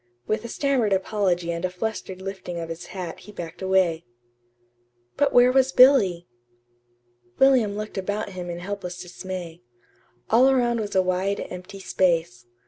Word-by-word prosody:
With 215 +1 -1
a - - -5
stammered 250 -5 +1
apology 185 -3 0
and 170 +1 -4
a 185 - 0
flustered 190 -1 -5
lifting 190 -3 -6
of 165 -1 -5
his 165 +2 -7
hat 180 -4 -6
he 200 +3 -13
backed 175 -3 -8
away. 185 -3 +2 1.1
But 285 -1 +2
where 245 +1 +6
was 265 0 +3
Billy? 215 -11 +5 1.1
William 245 -7 +4
looked 215 -2 -4
about 205 +2 -3
him 180 -2 -7
in 170 - -4
helpless 180 -1 -6
dismay. 180 -1 -7 0.7
All 250 +4 +6
around 240 -3 +2
was 210 -2 -4
a 190 - +4
wide, 185 +2 -1
empty 185 +2 -8
space. 165 -11 0
190 Hz, 150 wpm, -24 LUFS, 175-215 Hz, 1.1 s, where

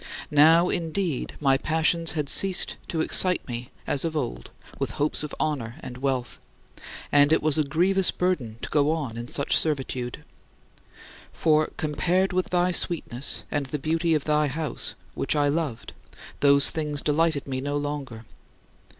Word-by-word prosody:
Now, 160 +4 +5
indeed, 170 -3 -2
my 135 -2 +2
passions 160 +1 +1
had 150 -3 -2
ceased 190 +4 +5
to 160 - -2
excite 180 +3 +2
me 120 0 -6 0.2
as 140 - -1
of 160 -2 -2
old - - -4 0.3
with - - -1
hopes 150 +1 0
of 150 - -6
honor 125 -7 -2
and 125 0 -9
wealth, 130 -2 -2 0.7
and 145 +1 +5
it 160 - +3
was 155 0 +2
a - - +3
grievous 180 +6 +2
burden 145 -12 -2
to - - -4
go 145 -1 +2
on 145 -8 -4
in 120 +1 -6
such 140 +2 0
servitude. 130 -5 -1 1.1
For, 155 -1 +2
compared 180 +5 0
with 185 0 -1
thy 180 0 +1
sweetness 150 -8 -1
and 145 -2 -2
the 150 - -3
beauty 160 +3 0
of 150 - -1
thy 150 0 +1
house 150 +3 -4 0.2
which - - -1
I 145 -1 +2
loved 145 -6 -3 0.5
those 140 0 +5
things 150 -2 -1
delighted 155 -1 +1
me 130 -1 -3
no 145 +1 -2
longer. 140 -6 -5
150 Hz, 160 wpm, -25 LUFS, 140-165 Hz, 1.1 s, Now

